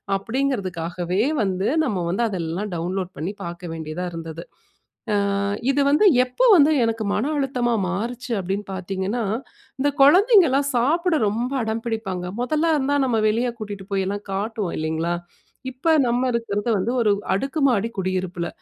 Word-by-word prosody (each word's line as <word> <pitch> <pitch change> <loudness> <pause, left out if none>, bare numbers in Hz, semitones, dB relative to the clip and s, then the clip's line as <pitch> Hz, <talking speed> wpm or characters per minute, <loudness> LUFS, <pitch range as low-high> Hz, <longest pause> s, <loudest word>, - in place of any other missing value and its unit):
அப்படிங்கிறதுக்காகவே 190 -6 -2 0.2
வந்து 190 -1 -1 0.2
நம்ம 195 - -1
வந்து 190 +7 -1
அதெல்லாம் 185 0 -3
டவுன்லோட் 180 +2 -2
பண்ணி 160 +7 -3
பார்க்க 170 0 -7
வேண்டியதா 160 +2 -5
இருந்தது. 165 0 -7 0.7
அ - - +3 0.6
இது 285 - +1
வந்து 300 +9 +4 0.2
எப்ப 250 - -6
வந்து 305 -2 +6
எனக்கு 225 -1 -1
மன 265 +9 0
அழுத்தமா 255 -4 0 0.2
மாறுச்சு. 240 +6 -4
அப்படின்னு 195 +2 -3
பார்த்தீங்கன்னா, 190 +5 -3 0.6
இந்த 285 +2 +2
குழந்தைங்கலாம் 325 - +6
சாப்பிட 325 +8 +2
ரொம்ப 235 +5 -1
அடம் 220 +1 -3
பிடிப்பாங்க 205 -6 -3 0.2
முதல்ல 310 +5 +1
இருந்தா 285 0 +1
நம்ம 235 -4 +1
வெளிய 235 +3 +1
கூட்டிட்டு 205 -3 -6
போய்லாம் 195 +1 -2
காட்டுவோம், 205 -2 -2
இல்லைங்களா! 160 +2 -1 0.6
இப்ப 265 +6 +1
நம்ம 245 +2 +1
இருக்கிறது 230 -2 -2
வந்து 205 +4 0
ஒரு 215 -3 +3 0.2
அடுக்கு 270 +10 -2
மாடி 230 -3 +1
குடியிருப்பில 185 -2 -2
210 Hz, 140 wpm, -23 LUFS, 185-255 Hz, 0.7 s, வந்து